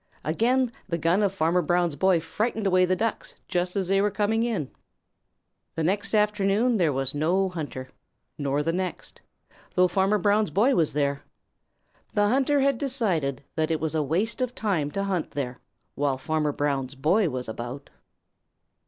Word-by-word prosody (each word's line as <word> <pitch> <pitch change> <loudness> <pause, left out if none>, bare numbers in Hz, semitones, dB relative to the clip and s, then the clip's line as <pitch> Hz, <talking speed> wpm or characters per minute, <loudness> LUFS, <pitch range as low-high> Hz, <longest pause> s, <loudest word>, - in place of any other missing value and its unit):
Again 240 +9 +1 0.2
the 170 - 0
gun 170 +5 +2
of 200 -2 +2
Farmer 180 -1 +1
Brown's 175 -1 +1
boy 185 +3 +3
frightened 215 +6 -2
away 185 -1 +4
the 185 +1 +1
Ducks 225 +2 -3
just 180 0 -1
as 195 -3 0
they 195 +1 +3
were 205 - +2
coming 210 +2 0
in. 215 - -2 1.0
The 160 - -1
next 205 +6 0
afternoon 210 +3 +2
there 170 -6 +2
was 135 -1 -2
no 175 +6 +1
hunter 145 -7 -6 0.5
nor 145 0 -1
the 165 +2 0
next, 185 +1 -5 0.5
though 180 0 +5
Farmer 190 +3 +2
Brown's 205 +2 +2
boy 240 +8 +3
was 160 - +2
there. 140 -1 0 0.9
The 205 -1 +3
hunter 275 +3 +2
had 275 -3 +2
decided 185 - 0
that 155 -1 0
it 160 -1 0
was 160 -1 -2
a 160 - +1
waste 185 - -1
of 250 -1 -2
time 180 -10 0
to 195 +6 -3
hunt 190 -5 -1
there 125 -3 -4 0.3
while 140 -2 0
Farmer 150 +2 -1
Brown's 140 -2 -2
boy 170 +8 +2
was 125 -2 -4
about. 120 +5 -7
180 Hz, 170 wpm, -26 LUFS, 150-210 Hz, 1.0 s, though